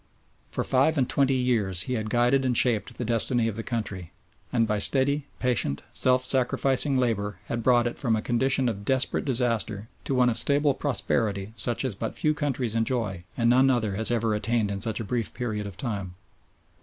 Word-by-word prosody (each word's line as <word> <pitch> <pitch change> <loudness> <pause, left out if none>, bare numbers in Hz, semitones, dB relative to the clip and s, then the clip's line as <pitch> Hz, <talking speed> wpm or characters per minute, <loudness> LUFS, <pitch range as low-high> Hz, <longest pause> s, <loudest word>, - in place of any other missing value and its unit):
For - - -2
five 140 +5 +2
and 130 -3 +2
twenty 135 -1 +1
years 110 -8 +2
he 130 - -3
had 110 -3 -3
guided 125 +4 +2
and 125 -3 +2
shaped 115 -5 +1
the 120 - -3
destiny 115 +1 +1
of 110 - -3
the 115 - -4
country, 105 -7 -5 0.4
and 115 -2 +2
by 105 -1 0
steady, 140 +5 +2
patient, 120 - -1
self 130 0 +2
sacrificing 135 +1 +2
labour 105 -6 -1
had 120 +3 -3
brought 120 0 +3
it 120 - -3
from 115 -4 +1
a 110 - -2
condition 130 +2 +1
of 100 -4 -3
desperate 130 +4 0
disaster 115 -5 -1 0.2
to 135 - -1
one 125 -1 +4
of 115 - +1
stable 145 0 +3
prosperity 110 -7 -1
such 120 +3 -2
as 130 - -1
but 95 - -5
few 155 - +1
countries 135 -6 -2
enjoy 115 -6 -2
and 115 - +1
none 130 +3 +5
other 115 -6 0
has 110 +3 0
ever 115 -2 0
attained 110 0 0
in 100 -1 -4
such 110 -1 +1
a - - -3
brief 115 +1 -3
period 110 -4 -3
of 100 - -9
time. 100 -7 -4
120 Hz, 195 wpm, -26 LUFS, 110-130 Hz, 0.4 s, none